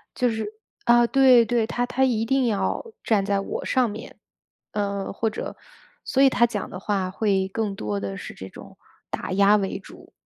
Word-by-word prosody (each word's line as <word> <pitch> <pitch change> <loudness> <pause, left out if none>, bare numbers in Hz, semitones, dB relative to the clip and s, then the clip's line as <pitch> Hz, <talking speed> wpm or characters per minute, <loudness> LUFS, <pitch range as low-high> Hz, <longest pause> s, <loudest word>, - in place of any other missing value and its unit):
就 250 - +2
是 220 -1 -3 0.4
啊， 240 0 +6
对 260 -2 +6
对， 230 -1 +1
他 245 +1 -1
他 265 +2 0
一 230 -4 +1
定 265 +2 +2
要 215 - -1 0.2
站 210 -4 +2
在 200 -1 +1
我 - - -5
上 255 -3 +2
面， 210 - -9 0.6
呃， 200 -1 -2
或 225 +3 0
者 215 - -6 0.5
所 270 - +3
以 270 - +7
他 240 -2 +3
讲 210 -3 -4
的 185 - -7
话 195 -2 -1
会 195 -2 0
更 205 0 -2
多 105 - -3
的 100 -1 -4
是 - - -8
这 95 - -9
种 - - -13 0.3
打 - - -4
压 200 +2 +5
为 195 -2 -2
主， - - -15
215 Hz, 205 characters per minute, -24 LUFS, 195-240 Hz, 0.6 s, 以